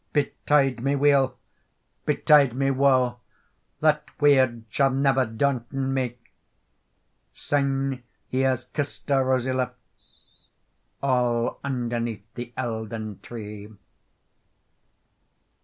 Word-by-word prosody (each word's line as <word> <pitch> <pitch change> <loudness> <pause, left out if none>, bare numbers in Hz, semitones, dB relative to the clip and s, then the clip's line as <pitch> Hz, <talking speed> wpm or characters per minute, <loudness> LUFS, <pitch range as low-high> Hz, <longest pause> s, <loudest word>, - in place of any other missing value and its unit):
"Betide 140 -3 +1
me 140 +1 +1
weal, 135 -3 +3 0.7
betide 140 -5 +4
me 135 +1 +1
woe, 130 -2 +2 0.6
That 150 -1 +3 0.2
weird 130 -5 +4
sall 135 -1 +3
never 135 -1 +2
daunton 130 +2 -1
me; 125 -2 -2 1.2
Syne 135 -2 -1 0.3
he 130 - -2
has 130 -2 +1
kissed 145 +3 -5
her 135 -1 +3
rosy 130 0 +1
lips, 130 -2 -6 0.8
All 125 -3 +1
underneath 120 -5 -2
the 120 0 -7
Eildon 110 -4 -4
Tree. 105 -3 -8
130 Hz, 90 wpm, -25 LUFS, 120-140 Hz, 1.2 s, betide